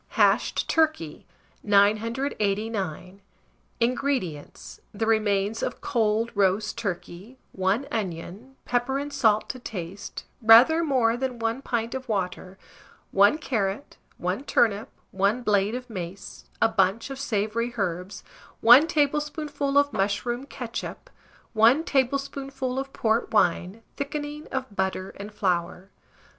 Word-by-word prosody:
HASHED - - +3
TURKEY. 310 - 0 0.3
989. 205 - 0 0.6
INGREDIENTS. 235 - -2
The 215 +2 -2
remains 215 -1 +1
of - - -3
cold 225 0 0
roast 200 +1 +1
turkey, 200 +2 -6
1 190 +7 0
onion, 205 +5 -5
pepper 245 +2 0
and 285 +1 -4
salt 220 -6 +2
to 255 - -5
taste, 195 -4 -7 0.2
rather 240 +9 +7
more 250 -7 +2
than 255 0 -3
1 230 +3 -2
pint 235 -3 -2
of 260 -2 -6
water, 185 -2 -3 0.5
1 200 +9 +5
carrot, 215 -5 -3 0.2
1 - - -2
turnip, 220 -5 +2 0.2
1 200 +6 +1
blade 205 0 +2
of 250 0 -6
mace, 195 -2 -8
a - - +5
bunch 210 +4 +1
of 270 - -6
savoury 230 -2 -1
herbs, 185 0 -3 0.4
1 245 +7 +8
tablespoonful 295 -1 0
of 285 0 +3
mushroom 230 +6 -1
ketchup, 250 - -7 0.4
1 235 +8 +5
tablespoonful 270 -1 -1
of 270 0 -5
port 225 -1 0
wine, 190 +1 +1
thickening 295 +1 -5
of 260 -5 -5
butter 190 0 -2
and 205 +2 -8
flour. 180 -1 -2
225 Hz, 120 wpm, -25 LUFS, 200-265 Hz, 0.6 s, 1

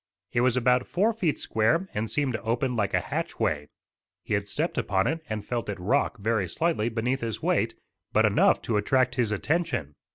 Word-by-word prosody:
It 120 - +1
was 125 0 +3
about 125 0 +2
four 210 +6 +2
feet 180 -9 0
square 115 - +1
and 105 +1 -2
seemed 140 -4 0
to - - -3
open 120 +2 -1
like 105 -3 0
a - - +4
hatchway. 75 -1 -2 0.6
He - - -3
had - - 0
stepped - - -1
upon 95 -1 +1
it 160 +6 -1
and 105 -1 -3
felt 120 -3 -3
it 100 - -4
rock, 125 +6 +1
very 105 -3 0
slightly, 120 - 0
beneath 120 +4 -1
his 115 -2 -4
weight, - - +1 0.4
but - - +4
enough - - +3
to 110 - 0
attract 130 +4 +2
his 120 -5 +1
attention. 140 - -1
120 Hz, 195 wpm, -27 LUFS, 105-135 Hz, 0.6 s, a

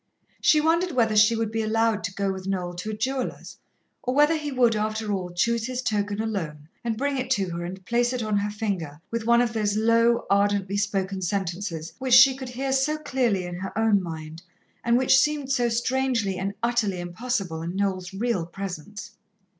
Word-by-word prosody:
She 305 - +5
wondered 335 +3 +2
whether 225 -4 +2
she 215 +2 +5
would 225 -1 -1
be 225 0 -1
allowed 225 0 +1
to 190 - -4
go 200 -1 0
with 190 0 -7
Noel 180 -2 -2
to 180 +5 -5
a - - -3
jeweller's, 255 +4 -3 0.4
or 255 +1 -2
whether 295 +3 +5
he 300 -2 -3
would, 245 -4 +3
after 215 0 -1
all, 185 -2 -3
choose 225 +6 0
his 255 0 -3
token 205 -3 -1
alone, 165 -10 -4 0.2
and 230 -2 -2
bring 280 +1 -1
it 255 - -3
to 195 -6 -1
her, 170 0 -4
and 185 +2 -7
place 240 +2 +1
it 250 -2 -2
on 215 -1 0
her 205 +1 0
finger 195 -9 -3
with 230 -1 -3
one 235 0 +5
of 240 -2 0
those 210 -2 0
low, 230 +1 +3
ardently 200 -1 +1
spoken 195 -2 -1
sentences 180 -3 -3
which 260 -2 +4
she 265 +1 +8
could 260 -1 -7
hear 265 +2 -2
so 275 +3 +1
clearly 250 -10 0
in 175 - -6
her 190 +3 -6
own 220 -3 +3
mind, 160 -2 -7 0.4
and 235 0 +3
which 260 +1 +5
seemed 295 -2 0
so 245 -3 +2
strangely 240 -3 0
and 195 +2 -3
utterly 230 -6 +1
impossible 180 -2 -3
in 170 +2 -4
Noel's 190 -2 -1
real 195 -4 -1
presence. 195 +2 -7
215 Hz, 200 wpm, -25 LUFS, 190-245 Hz, 0.4 s, she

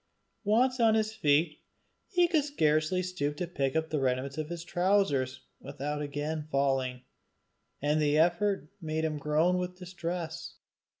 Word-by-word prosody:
Once 250 +5 +3
on 225 -2 +5
his 220 0 +1
feet, 150 -5 +2 0.5
he 355 -3 +4
could 320 -4 +2
scarcely 160 - +1
stoop 150 -5 -2
to 180 - -1
pick 140 -5 -2
up 160 0 0
his 150 -3 0
remnant 130 +1 0
of 155 - -2 0.2
trowsers 175 -9 +1 0.2
without 150 +2 -4
again 150 +1 -3
falling, 135 -2 0 0.8
and 150 +1 +2
the 150 0 +3
effort 175 0 +2
made 160 0 -1
him 155 -2 -2
groan 160 +5 +2
with 180 0 -4
distress. 175 -2 -5
160 Hz, 140 wpm, -30 LUFS, 145-180 Hz, 0.8 s, on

